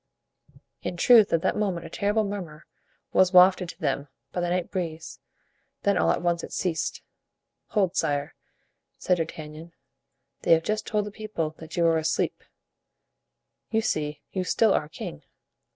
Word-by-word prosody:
In 175 Hz, -, -4 dB
truth 225 Hz, +2 st, +6 dB
at 165 Hz, -, +2 dB
that -, -, +1 dB
moment 190 Hz, -5 st, -1 dB
a -, -, -8 dB
terrible 210 Hz, +2 st, +1 dB
murmur 180 Hz, -7 st, -6 dB, 0.5 s
was 185 Hz, -1 st, +5 dB
wafted 180 Hz, 0 st, +6 dB
to -, -, -10 dB
them 140 Hz, -, -1 dB, 0.2 s
by 180 Hz, -, -2 dB
the 175 Hz, -, 0 dB
night 180 Hz, 0 st, -1 dB
breeze; 165 Hz, -4 st, -4 dB, 0.6 s
then 200 Hz, 0 st, +3 dB
all -, -, +2 dB
at -, -, +1 dB
once 170 Hz, -1 st, +1 dB
it -, -, -7 dB
ceased. 170 Hz, -3 st, -2 dB, 0.6 s
"Hold, 195 Hz, -5 st, +1 dB
sire," 145 Hz, -1 st, 0 dB, 0.6 s
said 180 Hz, -, +1 dB
D'Artagnan, 160 Hz, 0 st, -6 dB, 0.7 s
"they -, -, +5 dB
have 165 Hz, 0 st, +3 dB
just 215 Hz, +2 st, -2 dB
told 210 Hz, -1 st, 0 dB
the 210 Hz, -, -6 dB
people 205 Hz, -7 st, -3 dB
that 160 Hz, +1 st, -9 dB
you 170 Hz, -, +3 dB
are 165 Hz, -1 st, +4 dB
asleep; 160 Hz, 0 st, -1 dB, 1.3 s
you 225 Hz, 0 st, +1 dB
see, 150 Hz, -7 st, -2 dB
you 185 Hz, -, -1 dB
still 215 Hz, +3 st, +3 dB
are 150 Hz, -, 0 dB
king." 75 Hz, -, -7 dB
175 Hz, 160 wpm, -26 LUFS, 160-200 Hz, 1.3 s, truth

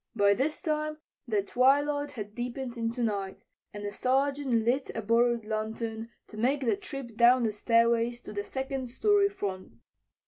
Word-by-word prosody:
By 200 Hz, -2 st, +5 dB
this 280 Hz, -, -1 dB
time 305 Hz, -2 st, -1 dB, 0.3 s
the 210 Hz, -4 st, +1 dB
twilight 285 Hz, +5 st, +2 dB
had 210 Hz, -4 st, -7 dB
deepened 245 Hz, +1 st, -4 dB
into 230 Hz, +1 st, -2 dB
night, 200 Hz, -4 st, -3 dB, 0.3 s
and 205 Hz, 0 st, -7 dB
the 205 Hz, -, -3 dB
Sergeant 275 Hz, +4 st, 0 dB
lit 260 Hz, +3 st, +1 dB
a 225 Hz, -, -2 dB
borrowed 235 Hz, +1 st, +2 dB
lantern 220 Hz, +1 st, -4 dB, 0.2 s
to 215 Hz, -, -12 dB
make 265 Hz, +6 st, +1 dB
the 255 Hz, -, +2 dB
trip 275 Hz, -, -8 dB
down 240 Hz, +2 st, +5 dB
the 220 Hz, -, +1 dB
stairway 230 Hz, +2 st, +3 dB
to 240 Hz, -3 st, -10 dB
the 205 Hz, -1 st, -3 dB
second 265 Hz, +2 st, -4 dB
story 400 Hz, -, +3 dB
front. 190 Hz, -, -6 dB
240 Hz, 165 wpm, -29 LUFS, 220-275 Hz, 0.3 s, By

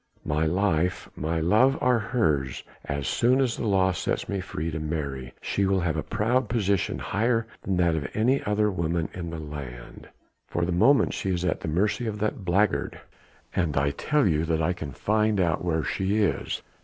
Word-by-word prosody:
My 75 Hz, +2 st, +1 dB
life, 90 Hz, 0 st, 0 dB
my 80 Hz, +2 st, -1 dB
love 110 Hz, -, +4 dB
are 125 Hz, -2 st, +3 dB
hers 80 Hz, -, 0 dB, 0.2 s
and 70 Hz, -, -3 dB
as 70 Hz, -, -4 dB
soon 125 Hz, +3 st, +3 dB
as 125 Hz, -4 st, +1 dB
the 115 Hz, -, -3 dB
law 95 Hz, -2 st, +3 dB
sets 85 Hz, -, -2 dB
me 100 Hz, -, -2 dB
free 85 Hz, -3 st, -4 dB
to 80 Hz, -, -3 dB
marry 70 Hz, -5 st, -4 dB
she 100 Hz, -1 st, 0 dB
will 95 Hz, -1 st, +2 dB
have 85 Hz, -2 st, 0 dB
a 80 Hz, -, -1 dB
proud 120 Hz, +6 st, 0 dB
position 100 Hz, -5 st, 0 dB
higher 115 Hz, +3 st, 0 dB, 0.2 s
than 95 Hz, -2 st, -1 dB
that 85 Hz, -2 st, +3 dB
of 75 Hz, -3 st, -2 dB
any 125 Hz, +6 st, +2 dB
other 105 Hz, 0 st, +1 dB
woman 85 Hz, -2 st, -1 dB
in 85 Hz, -2 st, -5 dB
the 85 Hz, -, -5 dB
land." 70 Hz, -6 st, -8 dB, 0.4 s
"For 85 Hz, -, -1 dB
the 90 Hz, -, -2 dB
moment 135 Hz, +11 st, +4 dB
she 95 Hz, -, -3 dB
is 90 Hz, -1 st, -1 dB
at 90 Hz, -, 0 dB
the -, -, -6 dB
mercy 105 Hz, +8 st, 0 dB
of 105 Hz, -1 st, -3 dB
that 105 Hz, -1 st, -2 dB
blackguard...." 95 Hz, +4 st, +1 dB, 0.6 s
"And 85 Hz, -6 st, 0 dB
I 70 Hz, +1 st, +2 dB
tell 150 Hz, -, +1 dB
you 80 Hz, -3 st, +2 dB
that 80 Hz, -1 st, 0 dB
I 80 Hz, +3 st, +1 dB
can 80 Hz, -5 st, -6 dB
find 105 Hz, -, +1 dB
out 85 Hz, -3 st, +1 dB
where 80 Hz, -3 st, 0 dB
she 95 Hz, +7 st, 0 dB
is." 105 Hz, -3 st, 0 dB
90 Hz, 200 wpm, -26 LUFS, 80-105 Hz, 0.6 s, love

